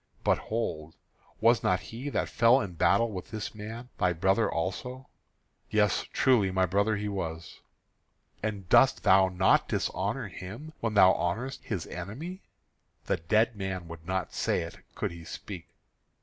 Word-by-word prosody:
But, - - +3
hold, 80 -9 -3 0.5
was - - +5
not - - +2
he 125 +6 -6
that - - -1
fell 120 +3 +5
in 100 -4 -4
battle 100 +7 +3
with 95 -3 -6
this 110 -2 -5
man 110 +3 -8
thy 90 -4 +3
brother 95 +6 +2
also?" 125 +10 -4 0.6
"Yes, 105 -3 +2
truly, 120 -7 +3
my 95 0 +2
brother 100 +4 +1
he 105 0 -3
was." 85 -5 -5 0.8
"And 105 -4 -3
dost - - +5
thou 95 0 +6
not 95 +1 +3
dishonour - - -1
him 115 +13 -9
when 115 -2 -2
thou 95 -2 +7
honourest 120 +11 -2
his 95 -8 -3
enemy?" 135 - -7 0.6
"The - - +1
dead 110 +8 +2
man 95 -3 -4
would 80 -1 -9
not 95 0 -2
say - - 0
it, - - -9 0.2
could - - -2
he 85 -1 -10
speak." 85 +1 -8
100 Hz, 155 wpm, -29 LUFS, 90-115 Hz, 0.8 s, thou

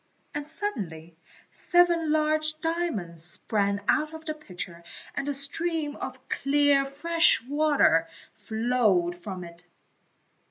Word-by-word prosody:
And 295 - -3
suddenly 185 - -5 0.4
seven 345 -3 +2
large 310 0 +2
diamonds 280 - -2
sprang 200 +3 0
out 310 +1 +1
of 320 0 -11
the 310 - -2
pitcher 180 - -9 0.3
and 280 - -3
a - - 0
stream 300 +2 -1
of 260 0 -8
clear, 285 0 +2
fresh 335 +5 +3
water 280 - +3 0.3
flowed 220 -5 +1
from 180 0 -7
it. 170 0 -10
275 Hz, 115 wpm, -27 LUFS, 190-310 Hz, 0.4 s, fresh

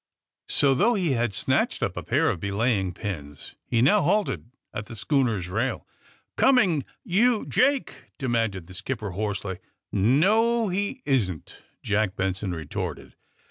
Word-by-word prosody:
So, 140 -1 +4
thongh 215 - +3
he 175 -6 +1
had 120 -3 +1
snatched - - 0
np - - -1
a - - -4
pair - - +2
of - - -4
belaying 100 0 0
pins, 75 -9 -6
he 115 0 +2
now 135 - +5
halted 180 - 0 0.2
at 105 0 -5
the 115 - -8
schooner's 115 - 0
Tail. 110 +8 -2 0.5
Coming 190 - +4
— - - -55
yon, 220 +5 +2
Jake!" 275 +1 +1
demanded 115 - -1
the 90 - -13
skip 125 +8 -4
per 105 -2 -5
hoarsely. 100 -1 -3 0.3
'*No; 210 - +3
he 205 +8 -2
isn't," 100 - -1 0.2
Jack 105 -2 0
Benson 95 +1 -2
retorted. 80 -4 -5
115 Hz, 145 wpm, -25 LUFS, -, 0.5 s, now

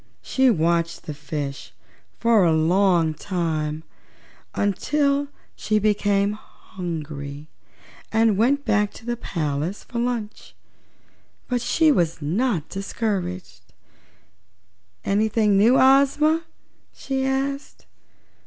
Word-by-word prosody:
She 265 -1 +2
watched 170 -4 0
the 150 - -6
fishes 145 -1 -6 0.4
for 230 -4 +4
a 170 - +4
long 170 0 +3
time, 160 -3 -3 0.7
until 280 +8 +1 0.3
she 215 - 0
became 205 -1 +2
hungry 155 -8 -7 0.6
and 225 -1 +3
went 270 +7 +2
back 210 -2 +2
to 225 - -13
the 240 0 -1
palace 160 -2 -3
for 235 - -5
lunch. 235 -3 -4 0.9
But 245 -1 -1
she 315 +5 +3
was 170 - +1
not 170 - -1
discouraged. 185 - -4 1.4
"Anything 210 0 +2
new, 225 +6 +5
Ozma?" 280 +5 +4 0.5
she 265 -1 -3
asked. 270 +1 -3
205 Hz, 95 wpm, -23 LUFS, 165-245 Hz, 1.4 s, new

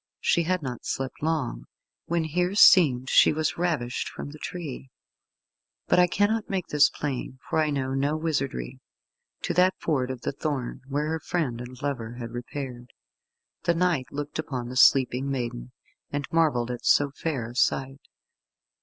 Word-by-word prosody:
She 170 - +2
had 180 0 -1
not 125 -3 -5
slept 135 -1 -4
long, 155 -5 -1 0.4
when 170 -1 +1
herseemed 175 - +5
she - - +6
was 155 +1 -1
ravished 155 -9 -1
from 145 - -7
the 155 - -12
tree 145 -7 -6 1.0
but - - +3
I 180 - +6
cannot 210 +4 +1
make 190 -3 -2
this 150 0 +5
plain 135 -2 -4
for - - 0
I 155 -1 +2
know 135 -2 -1
no 140 +3 0
wizardry 135 - -2 0.6
to - - -1
that 185 +1 +4
Ford 130 -6 0
of 130 -2 -5
the - - -2
Thorn, 140 -3 -3
where 145 +2 -1
her 160 +1 -2
friend 145 -10 -2
and 125 0 -9
lover 120 -5 -3
had 120 -2 -7
repaired. 125 0 -7 0.7
The 170 - +3
knight 165 -7 +1
looked 145 +1 -5
upon 130 -6 -4
the 125 - -7
sleeping 130 +1 +4
maiden, 120 - -4 0.4
and 145 0 -3
marvelled 145 -8 +2
at 120 - -6
so 145 -1 +4
fair 140 -5 -3
a - - -14
sight. 135 +2 0
140 Hz, 165 wpm, -26 LUFS, 125-160 Hz, 1.0 s, she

